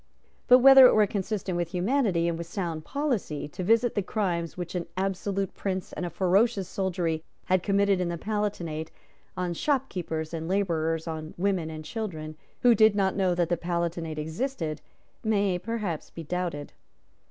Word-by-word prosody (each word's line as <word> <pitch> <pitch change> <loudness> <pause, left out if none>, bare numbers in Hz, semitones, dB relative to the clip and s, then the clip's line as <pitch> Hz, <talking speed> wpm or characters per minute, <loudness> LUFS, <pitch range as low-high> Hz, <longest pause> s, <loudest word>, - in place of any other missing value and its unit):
But 250 - +9
whether 265 0 +9
it - - +3
were 215 -1 +5
consistent 200 -2 -3
with 175 0 -2
humanity 190 -3 +1
and 170 - 0
with 170 0 -6
sound 170 -4 -4
policy 245 - -2
to 180 - -6
visit 230 +4 +3
the 205 - 0
crimes 180 -5 -2
which 175 -1 -5
an 175 -2 -3
absolute 195 0 -1
Prince 190 -2 -4
and 180 - -3
a - - -4
ferocious 195 +3 +2
soldiery 175 -4 -2 0.2
had 185 -1 +2
committed 200 -1 +2
in 175 - -1
the 170 - -3
Palatinate 175 -6 -3 0.5
on 180 -1 -1
shopkeepers 170 - -2
and 160 0 -4
labourers, 165 -4 0
on 155 -1 -5
women 185 -3 0
and 155 -1 -7
children, 155 -7 -5 0.3
who 245 -1 +6
did 220 -1 +5
not 195 -2 +1
know 185 -3 +2
that 175 -1 +1
the 175 - +1
Palatinate 170 -2 -2
existed, 160 - -3 0.4
may 200 -4 +1
perhaps 200 -5 -4
be 165 - -8
doubted. 170 -3 -3
180 Hz, 165 wpm, -27 LUFS, 165-205 Hz, 0.5 s, But